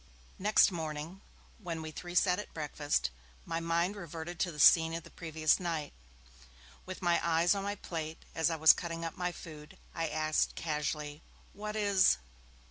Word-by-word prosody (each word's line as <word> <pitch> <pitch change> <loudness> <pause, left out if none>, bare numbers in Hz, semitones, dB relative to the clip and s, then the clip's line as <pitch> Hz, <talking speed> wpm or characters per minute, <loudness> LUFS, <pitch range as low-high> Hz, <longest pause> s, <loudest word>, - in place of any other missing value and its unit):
Next 210 +1 +5
morning, 160 +2 -5 0.4
when 165 -5 -5
we 155 - -6
three 175 +3 -8
sat 180 0 +3
at 210 - -8
breakfast, 145 - -1 0.3
my 165 - -2
mind 170 +4 0
reverted 170 -2 -7
to 180 - 0
the 150 - -11
scene 165 +2 +6
of 165 - -5
the - - -14
previous 160 -2 +1
night. 165 -5 -3 0.9
With 185 0 -7
my 175 -1 +3
eyes 170 +2 +3
on 200 - -2
my 200 +1 -2
plate, 160 -4 -6
as 160 +1 +2
I 165 - -1
was 160 0 +8
cutting 165 -1 -5
up 165 - -5
my 180 0 -2
food, 155 -4 -11 0.2
I 165 0 -1
asked, 155 0 0
casually, 150 -1 -3 0.3
'What 210 +1 -5
is 200 - +4
165 Hz, 170 wpm, -32 LUFS, 155-180 Hz, 0.9 s, was